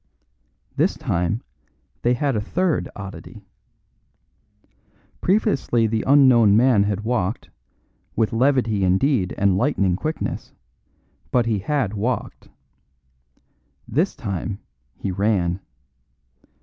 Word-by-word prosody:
This -, -, +1 dB
time 90 Hz, +7 st, -1 dB, 0.6 s
they 120 Hz, +1 st, +2 dB
had 135 Hz, 0 st, 0 dB
a 105 Hz, -, 0 dB
third 175 Hz, -, -1 dB
oddity. 100 Hz, +2 st, -9 dB, 1.8 s
Previously 140 Hz, -, +1 dB
the 110 Hz, 0 st, -1 dB
unknown 125 Hz, -7 st, +6 dB
man 120 Hz, -3 st, +4 dB
had 100 Hz, 0 st, -1 dB
walked, 110 Hz, -3 st, -2 dB, 0.6 s
with 110 Hz, +1 st, 0 dB
levity 115 Hz, -5 st, +2 dB
indeed 95 Hz, +2 st, +1 dB
and 100 Hz, -2 st, +2 dB
lightning 100 Hz, -9 st, +1 dB
quickness, 155 Hz, -, -4 dB, 0.8 s
but 120 Hz, +5 st, +2 dB
he 110 Hz, -3 st, 0 dB
had 125 Hz, -1 st, -1 dB
walked. 115 Hz, +4 st, -3 dB, 1.4 s
This 160 Hz, -, 0 dB
time 100 Hz, 0 st, -4 dB, 0.4 s
he 95 Hz, -, -4 dB
ran. 95 Hz, -2 st, 0 dB
110 Hz, 95 wpm, -22 LUFS, 100-130 Hz, 1.8 s, unknown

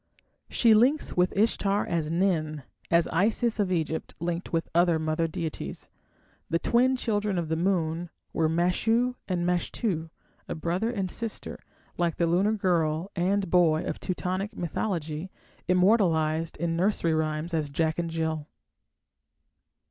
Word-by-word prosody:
She 230 Hz, -2 st, +4 dB
links 255 Hz, +8 st, +3 dB
with 180 Hz, +1 st, +3 dB
Ishtar 205 Hz, -1 st, +2 dB
as 165 Hz, -3 st, -1 dB
Nin, 160 Hz, -4 st, 0 dB, 0.3 s
as 170 Hz, 0 st, +4 dB
Isis 225 Hz, +5 st, +1 dB
of 195 Hz, -3 st, +1 dB
Egypt 160 Hz, -2 st, -2 dB
linked 170 Hz, +1 st, -3 dB
with 165 Hz, -1 st, 0 dB
other 170 Hz, -1 st, +4 dB
mother 155 Hz, +1 st, 0 dB
deities. 165 Hz, -2 st, -5 dB, 0.6 s
The 165 Hz, -, +2 dB
twin 250 Hz, +8 st, +3 dB
children 210 Hz, -5 st, -1 dB
of 165 Hz, -2 st, -2 dB
the 160 Hz, -, +1 dB
moon 170 Hz, -1 st, 0 dB, 0.2 s
were 160 Hz, -1 st, +2 dB
Mashu 225 Hz, +9 st, +2 dB
and 175 Hz, -2 st, -1 dB
Mashtu, 175 Hz, -1 st, -1 dB, 0.4 s
a -, -, -3 dB
brother 175 Hz, +7 st, -1 dB
and 195 Hz, -6 st, -2 dB
sister, 230 Hz, -2 st, -5 dB, 0.4 s
like 170 Hz, -1 st, +1 dB
the 170 Hz, -, +1 dB
lunar 185 Hz, +6 st, +2 dB
girl 175 Hz, -3 st, 0 dB
and 190 Hz, +1 st, 0 dB
boy 165 Hz, -3 st, +4 dB
of -, -, -4 dB
Teutonic 185 Hz, +4 st, -3 dB
mythology 170 Hz, -1 st, -3 dB, 0.4 s
immortalized 170 Hz, -5 st, +2 dB
in 165 Hz, +1 st, -1 dB
nursery 170 Hz, -2 st, +1 dB
rhymes 155 Hz, +1 st, -1 dB
as 155 Hz, -3 st, 0 dB
Jack 160 Hz, +3 st, 0 dB
and 170 Hz, -1 st, -1 dB
Jill. 160 Hz, -2 st, -2 dB
175 Hz, 140 wpm, -27 LUFS, 160-195 Hz, 0.6 s, She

